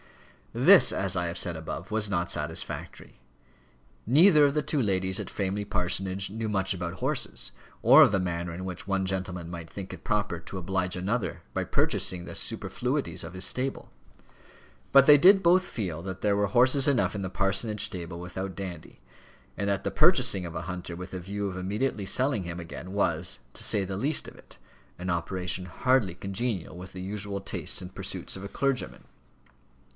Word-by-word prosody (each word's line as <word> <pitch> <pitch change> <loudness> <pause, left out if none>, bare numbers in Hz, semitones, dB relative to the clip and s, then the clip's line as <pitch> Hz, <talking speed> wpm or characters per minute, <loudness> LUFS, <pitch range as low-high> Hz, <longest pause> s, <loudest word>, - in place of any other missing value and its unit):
This, - - +7
as 95 -1 0
I 90 -1 0
have 85 - -4
said 85 - 0
above, 80 +4 -6
was 105 -1 +1
not 85 -3 -1
satisfactory. 75 -4 -4 0.9
Neither 155 - +7
of 140 - +2
the 150 - +1
two 150 - 0
ladies 95 -3 +1
at - - -5
Framley 100 +1 -2
Parsonage 95 0 -1
knew 110 +1 -3
much 95 -2 +1
about 90 -1 -4
horses, - - -2 0.3
or - - +9
of - - +7
the 100 - +2
manner 85 -1 -2
in 90 +3 -6
which 90 0 -6
one 95 -1 0
gentleman 90 -3 -3
might 85 -2 -7
think 95 -2 -7
it - - -10
proper 105 -5 -1
to 90 +3 -8
oblige 90 0 -1
another 100 +6 -2
by - - -1
purchasing 90 -1 0
the - - -8
superfluities - - -2
of - - -8
his 95 0 -1
stable; 130 +1 -2 1.0
but 135 -1 +8
they 150 0 +9
did 190 +6 +6
both 180 +2 +5
feel 90 - -4
that 95 0 -6
there 105 -1 +2
were 100 0 +2
horses 130 +6 +4
enough 135 -6 +2
in 100 - -3
the 95 - -3
parsonage 100 +3 0
stable 85 -1 -6
without 95 +2 -5
Dandy, 90 -5 -7 0.6
and 100 - -2
that 100 -2 0
the - - 0
purchasing 95 -2 +4
of 85 - -9
a 80 - -3
hunter 90 -1 -6
with 90 +1 -8
the 95 - -5
view 100 +3 -4
of 95 - -5
immediately 100 +3 -2
selling 130 -2 +1
him 85 0 -6
again, 85 +2 -8
was, 100 +1 -1
to - - -6
say 100 -2 +2
the 95 0 -4
least 145 +8 0
of - - -11
it, - - -14 0.4
an 90 +1 -3
operation 90 +1 -2
hardly 110 0 +1
congenial 100 -1 -3
with 90 +1 -9
the 95 - -8
usual 100 +1 -4
tastes 95 - -4
and 90 0 -10
pursuits - - -4
of 95 - -8
a 100 - -6
clergyman. 135 +1 -2
95 Hz, 190 wpm, -28 LUFS, 90-105 Hz, 1.0 s, or